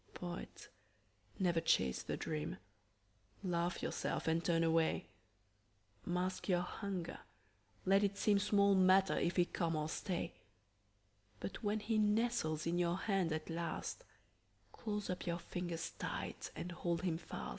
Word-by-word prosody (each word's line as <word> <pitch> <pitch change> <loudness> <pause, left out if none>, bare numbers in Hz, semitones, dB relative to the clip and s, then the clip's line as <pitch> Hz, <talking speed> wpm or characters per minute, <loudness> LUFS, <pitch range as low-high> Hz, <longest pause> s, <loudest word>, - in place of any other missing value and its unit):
Poet, 175 -1 -6 0.7
never 175 -4 +2
chase 65 - +3
the - - -3
dream. 155 0 -3 0.9
Laugh 175 -1 0
yourself - - -1
and 165 +1 +2
turn 165 -1 +3
away. 165 0 +2 1.0
Mask 180 +3 -1
your 175 -1 +4
hunger; 180 -1 -4 0.7
let 195 +2 +5
it 200 0 +1
seem 205 -1 +4
Small 200 -1 +4
matter 190 0 +5
if 170 - +1
he 175 - +5
come 170 -2 -1
or 155 0 0
stay; 175 +2 -2 1.1
But 195 - -5
when 210 0 0
he 220 0 +1
nestles 210 -7 +2
in 170 +1 +1
your 175 0 +2
hand 190 -4 +1
at 155 0 -2
last, 170 - -3 0.7
Close 210 -2 -3
up 180 0 -3
your 170 0 +1
fingers 175 -1 -4
tight - - -3
and 180 - -4
hold 175 0 -1
him 165 -3 0
fast. 65 - -6
175 Hz, 140 wpm, -37 LUFS, 165-195 Hz, 1.1 s, let